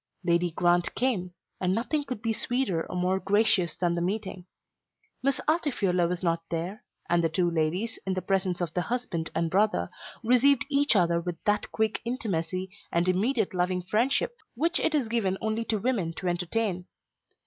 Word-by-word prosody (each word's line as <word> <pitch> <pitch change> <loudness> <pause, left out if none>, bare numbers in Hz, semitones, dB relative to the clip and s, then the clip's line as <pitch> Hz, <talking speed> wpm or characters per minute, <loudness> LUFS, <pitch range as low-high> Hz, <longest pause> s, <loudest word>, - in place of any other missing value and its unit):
Lady 175 0 +2
Grant 175 +1 +1
came, 215 -8 0 0.3
and 185 0 +1
nothing 290 +6 0
could 250 -4 -6
be 225 -1 +1
sweeter 230 -8 0
or - - -5
more 180 +1 +1
gracious 195 -4 +2
than 175 -2 0
the 170 - -1
meeting. 190 -1 -3 0.7
Miss 275 0 +1
Altifiorla 215 - +2
was 180 +1 -3
not 165 -1 +1
there, 175 +7 -4 0.2
and 175 0 +2
the 165 - +2
two 175 +1 +1
ladies, 170 +8 -1
in 190 -1 -1
the 185 - -1
presence 185 -2 0
of 170 -2 -2
the 180 - 0
husband 215 -8 -2
and 165 -1 0
brother, 210 +3 +2 0.3
received 250 +3 +4
each 285 -3 +4
other 170 -3 +3
with 175 -1 -4
that 210 0 0
quick 220 -1 0
intimacy 190 -6 -2 0.2
and 170 +1 +1
immediate 210 +4 +1
loving 180 0 0
friendship 235 - +1 0.2
which 335 +7 +2
it 315 - +1
is 275 -6 +1
given 215 -5 0
only 220 +1 -1
to 220 - 0
women 200 -7 -1
to 185 - -5
entertain. 180 +2 -1
190 Hz, 175 wpm, -28 LUFS, 175-230 Hz, 0.7 s, received